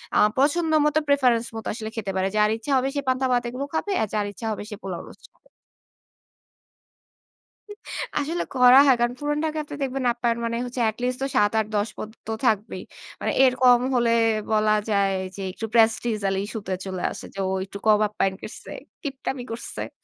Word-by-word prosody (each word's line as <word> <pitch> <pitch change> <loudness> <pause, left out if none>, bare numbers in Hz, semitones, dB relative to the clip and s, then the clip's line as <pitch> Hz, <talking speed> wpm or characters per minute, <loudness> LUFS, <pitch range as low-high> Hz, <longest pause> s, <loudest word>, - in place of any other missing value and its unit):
আ - - +4 0.2
পছন্দ 315 +3 +2
মতো, 300 +1 +3
preference 250 -5 +3
মতো 225 - -6
আসলে 220 -1 -5
খেতে 205 -3 -3
পারে। 190 0 +1
যার 210 0 +4
ইচ্ছা 255 +6 -5
হবে 260 +1 +1
সে 285 - 0
পান্তা 260 +1 +1
ভাত 245 -1 +2
এগুলো 260 +3 -4
খাবে, 400 +5 -1
আর 220 - +1
যার 210 -1 0
ইচ্ছা 225 - -8
হবে 210 - -4
সে 210 - -6
পোলাও, 180 -3 -4
রোস্ট। - - -16 2.9
আসলে 320 +4 -1
করা 250 +1 +7
হয়। 265 -3 +6
কারণ, 240 0 +2
পুরান 295 0 -1
ঢাকাতে 305 -1 -3
দেখবেন 265 -1 -2
আপনার, 235 -1 0
মানে 230 0 -2
হচ্ছে 245 0 -4
at 220 - -6
least 250 0 0
তো - - +1
৭, 205 0 +4
৮, 215 - +1
১০ 205 +1 +1
পদ 215 - -5 0.2
তো - - -2
থাকবেই। 215 -1 0 0.4
মানে - - -1
এর 255 - +4
কম 245 -1 +6
হলে 235 -1 +3 0.4
বলা 215 0 +3 0.2
যায় 200 -1 +2 0.2
যে, 200 - -7
একটু 225 - -5
prestigial 220 -3 +2
issue 210 +1 -5
তে 190 - -1
চলে 185 -2 -4
আসে - - -8
যে, 195 - -8
ও - - -1
একটু 200 - -9
কম 210 -1 +6
আপ্যায়ন 195 -2 -1
করছে, - - -9 0.3
কিপটামি 270 -3 -4
করছে। 230 - -5
235 Hz, 190 wpm, -24 LUFS, 210-265 Hz, 2.9 s, করা